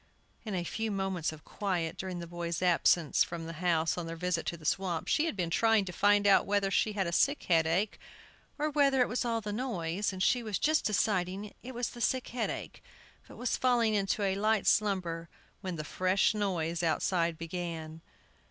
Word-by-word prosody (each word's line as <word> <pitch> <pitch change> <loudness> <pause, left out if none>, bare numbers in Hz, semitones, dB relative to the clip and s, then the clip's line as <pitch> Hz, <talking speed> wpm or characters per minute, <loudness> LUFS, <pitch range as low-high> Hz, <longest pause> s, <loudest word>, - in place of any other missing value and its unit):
In 210 -3 -3
a 175 - -1
few 220 +6 -3
moments 190 -5 -1
of 155 -1 -12
quiet, 175 -5 -2
during 185 -1 -5
the 170 - -5
boys' 170 0 -4
absence 170 -3 +3
from 170 -1 -6
the 165 - -6
house 170 -1 +1
on 170 - -5
their 165 - -5
visit 175 0 -2
to 170 - -2
the 155 - -14
swamp, 175 0 -1
she 310 - +2
had 330 - -2
been 175 -3 -2
trying 225 +2 +3
to 180 - -5
find 205 +2 +3
out 200 -2 +5
whether 200 -1 +1
she 215 +2 +2
had 195 -2 0
a 170 - -2
sick 280 - +2
headache, 170 +4 +1 0.6
or 305 +1 -1
whether 280 -3 +3
it 250 - +4
was 245 +2 -2
all 230 -1 0
the 210 -1 -4
noise, 205 -6 -2
and 185 0 -3
she 250 +3 +3
was 215 -4 -2
just 310 +1 +2
deciding 200 -1 0
it 255 +1 -9
was 245 0 -1
the 240 - -10
sick 255 +1 0
headache, 240 -2 -4 0.4
but - - -13
was 245 - -1
falling 240 -3 +2
into 205 0 0
a 195 -1 +2
light 215 +1 +1
slumber, 175 -6 +1 0.3
when 185 -3 -4
the 155 - -4
fresh 185 +6 +1
noise 175 -5 -1
outside 170 +1 +1
began. 165 -1 -5
190 Hz, 200 wpm, -31 LUFS, 170-215 Hz, 0.6 s, out